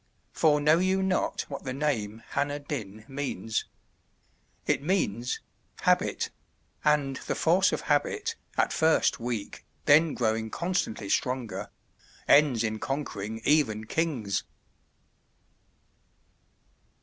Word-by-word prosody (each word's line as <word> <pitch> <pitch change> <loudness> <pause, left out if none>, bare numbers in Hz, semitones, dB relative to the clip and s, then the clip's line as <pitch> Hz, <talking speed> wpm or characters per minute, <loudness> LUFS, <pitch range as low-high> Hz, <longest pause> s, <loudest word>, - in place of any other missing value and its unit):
For 150 -2 +4
know 155 +3 +4
you 190 +1 +2
not 190 -1 0
what 140 - -7
the 130 - -3
name 115 -7 -1
Hanner 145 +1 0
Dyn 110 -8 -6
means? 135 -5 -3 1.0
It - - +1
means 125 - 0 0.4
Habit; - - +1 0.5
and 145 -3 +2
the - - 0
force 180 +4 +3
of - - -2
habit, 410 - 0 0.2
at - - +2
first 160 0 +3
weak, 115 -3 -4 0.2
then 155 +2 +5
growing 110 -1 0
constantly 170 - -2
stronger, 125 +2 -1 0.6
ends 140 -6 +5
in 110 -1 -2
conquering 110 -6 -4
even 115 -8 +2
kings!" 120 -9 -1
140 Hz, 105 wpm, -28 LUFS, 110-155 Hz, 1.0 s, then